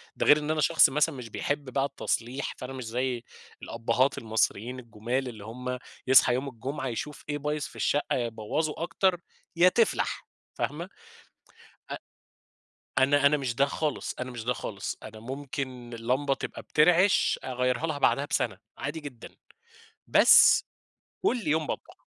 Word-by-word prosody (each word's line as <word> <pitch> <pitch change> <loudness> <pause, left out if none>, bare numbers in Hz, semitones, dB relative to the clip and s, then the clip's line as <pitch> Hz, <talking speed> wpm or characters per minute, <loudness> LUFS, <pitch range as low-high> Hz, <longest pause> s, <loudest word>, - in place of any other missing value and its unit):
ده - - -1
غير 150 - +7
إن 150 +1 -2
أنا 155 -1 0
شخص - - +6
مثلًا 150 +1 +1
مش 120 -3 -8
بيحب 145 +3 -3
بقى 135 0 +2
التصليح، 135 -1 -3
فأنا 130 0 -7
مش 130 -3 -6
زي 125 +1 -2 0.4
الأبهات 115 +4 0
المصريين 110 +2 -1
الجُمال، 120 +3 -3
اللي 110 -4 -8
هُم 125 +2 -5 0.3
يصحى 130 -1 +7
يوم 130 +3 -2
الجمعة 135 +3 -5
يشوف 140 +5 -5
إيه 145 - -1
بايظ 150 0 -2
في - - -7
الشقة، 145 - 0
يا 120 -2 0
يبوَّظوا 115 +9 -3
أكتر 175 0 +1 0.3
يا 180 +2 +6
تِفْلَح، 235 - 0 0.3
فاهمة. - - -4 1.0
أ - - -2 1.0
أنا 140 +2 +4
أنا 150 +1 +5
مش 130 -4 -3
ده 140 +3 +3
خالص، 150 0 -3
أنا 130 0 -4
مش 115 -2 -7
ده 125 - +1
خالص، 100 -5 -5
أنا 110 0 -10
ممكن 130 -1 -6
اللمبة 130 +5 0
تبقى - - -7
بترعش، 175 +5 +3
أغيرها 125 +3 -1
لها 150 -3 -3
بعدها 140 0 +2
بسَنَة، 95 -8 -1 0.2
عادي 150 +3 -4
جدًا، 135 -6 -10 0.7
بس - - +7 0.6
كل 255 - 0
يوم 155 0 +1
باطبخ. - - -7
130 Hz, 155 wpm, -28 LUFS, 120-150 Hz, 1.0 s, غير